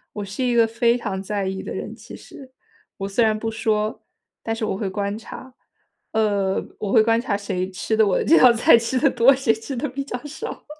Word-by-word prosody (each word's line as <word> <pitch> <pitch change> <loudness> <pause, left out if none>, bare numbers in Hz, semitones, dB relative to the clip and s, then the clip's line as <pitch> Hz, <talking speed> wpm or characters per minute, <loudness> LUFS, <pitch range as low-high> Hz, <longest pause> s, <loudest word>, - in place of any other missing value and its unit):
我 205 -1 -4
是 200 +7 -4
一 245 -1 +1
个 230 - +5
非 235 +1 +1
常 200 -5 -4
在 200 0 -3
意 190 0 -4
的 - - -6
人， - - -6
其 - - -12
实。 265 -2 -13 0.5
我 195 - -4
虽 205 +4 +1
然 215 -1 +2
不 225 +1 -3
说， 215 -1 -1 0.4
但 225 0 -3
是 225 - -3
我 210 - -2
会 195 0 -3
观 200 +1 -3
察， 255 +3 -11 0.6
呃， 205 -3 0 0.2
我 205 - -3
会 220 - +5
观 225 +1 +2
察 215 -5 -1
谁 190 -2 -3
吃 195 +3 -2
得 220 -1 +4
我 190 - +2
的 - - -1
这 330 - +6
道 250 - +8
菜 235 0 +5
吃 230 +2 0
得 285 - +3
多， 265 +4 +5
谁 260 -4 +1
吃 225 +5 -7
得 285 +5 -2
比 275 +2 -4
较 250 -2 -5
少。 315 +10 -7
220 Hz, 250 characters per minute, -22 LUFS, 200-240 Hz, 0.6 s, 道